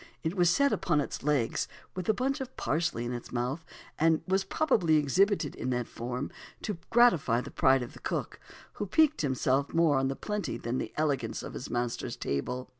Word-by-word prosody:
It 160 - -1
was 175 -2 +4
set 280 +9 +3
upon 175 -5 +1
its 145 - -3
legs, 140 -5 +1 0.3
with 185 +2 -4
a - - +6
bunch 270 +4 -1
of 260 0 -7
parsley 155 -7 0
in 120 - -3
its 120 - -7
mouth, 125 +6 -2 0.4
and 160 0 +3
was 190 +1 +2
probably 185 - +2
exhibited 155 +3 +2
in 130 - -4
that 125 -1 0
form 125 +3 -4 0.3
to 205 -5 -3
gratify 175 - +4
the 135 - -9
pride 130 -1 +4
of 120 - -8
the - - -12
cook, - - -3 0.4
who 205 - -1
piqued 310 - +3
himself 135 0 0
more 165 -4 +4
on 135 - +1
the 135 - -2
plenty 210 - -3
than 120 +2 -2
the - - -4
elegance 140 -7 -1
of - - -7
his - - -6
master's 120 -1 -2
table. 125 - -3
150 Hz, 195 wpm, -30 LUFS, 125-190 Hz, 0.4 s, a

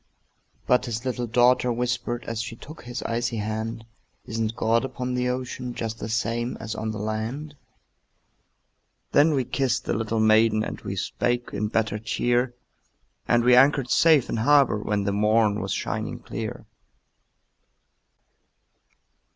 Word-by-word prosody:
But 125 +1 +2
his 115 +1 -4
little 125 -1 -2
daughter 125 +2 +3
whispered, 120 0 -2
As 115 -1 -3
she 115 0 -6
took 155 +7 -12
his 120 0 -5
icy 120 0 -2
hand, 110 +2 -4 0.4
"Isn't 115 0 -2
God 115 0 +2
upon 125 -1 -4
the 125 0 0
ocean, 125 -1 -4
Just 115 -1 -4
the - - -5
same 115 +2 -1
as 110 -1 -5
on 110 +1 -3
the 110 - -4
land?" 110 +8 -4 1.6
Then 150 +1 +4
we 130 - +1
kissed 130 -1 -1
the - - -1
little 110 0 -1
maiden, 110 0 +4
And - - -6
we - - -5
spake 120 0 -1
in 105 - -1
better 110 0 0
cheer, 120 +3 0 0.7
And 120 0 +3
we 125 +1 +6
anchored 135 0 +4
safe 155 -6 +5
in - - -2
harbor 135 -2 +4
When 105 -1 -1
the 100 0 -1
morn 105 0 +2
was 95 - -4
shining - - -3
clear. - - -6
120 Hz, 145 wpm, -25 LUFS, 110-125 Hz, 1.6 s, we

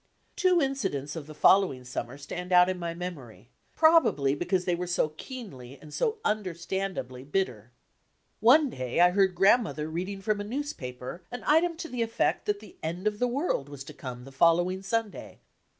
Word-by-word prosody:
Two 365 -2 +3
incidents 195 - -2
of 155 -3 -7
the 155 - -10
following 185 -8 +4
summer 125 +1 -5
stand 175 +6 -7
out 180 0 +6
in 185 -1 -2
my 170 -1 -4
memory, 130 - -8 0.2
probably 315 - +4
because 180 +4 -1
they 180 - +1
were 180 +1 -3
so 175 -3 +1
keenly 155 - -9
and 150 0 -13
so 450 -1 0
understandably 185 -8 -3
bitter. 135 - -2 0.7
One 270 +5 +5
day 130 +3 -3
I 175 +1 +6
heard 190 -1 +2
Grandmother 190 -5 +3
read 175 +4 -3
ing 195 -1 -6
from 210 0 0
a - - -3
newspaper 180 - -5
an 245 - -7
item 325 +2 +3
to 330 - -5
the 250 -6 -4
effect 230 0 0
that 205 0 0
the 215 - -14
end 170 +5 -4
of 210 -1 0
the 250 - +2
world 245 - -1
was 140 -2 -8
to - - -11
come 125 -2 -8
the 135 - -12
following 175 +6 +3
Sunday. 220 +1 -3
180 Hz, 180 wpm, -28 LUFS, 145-220 Hz, 0.7 s, out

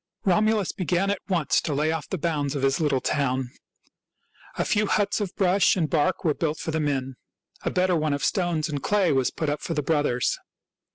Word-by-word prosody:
Romulus 210 +1 +2
began 185 +2 0
at 200 - -3
once 170 -7 +2
to 150 - -2
lay 155 +2 +1
off 160 -2 -4
the 190 - -2
bounds 145 -3 -1
of 140 - -2
his 135 0 +2
little 145 -5 +1
town. 130 -2 -1 1.1
A - - 0
few 210 0 +1
huts 205 +1 +1
of 195 -3 -4
brush 190 0 +3
and 170 -5 +1
bark 170 +5 +1
were 155 -4 +2
built 155 0 -2
for 160 - -4
the 160 - -1
men. 135 -4 -2 0.4
A - - -1
better 180 0 +2
one 155 -2 0
of 140 0 -1
stones 175 -4 0
and 145 -3 -4
clay 200 -1 +2
was 135 -2 +2
put 155 - -4
up 145 0 -1
for 165 - -3
the 150 - -1
brothers. 145 -5 +1
155 Hz, 210 wpm, -25 LUFS, 145-185 Hz, 1.1 s, brush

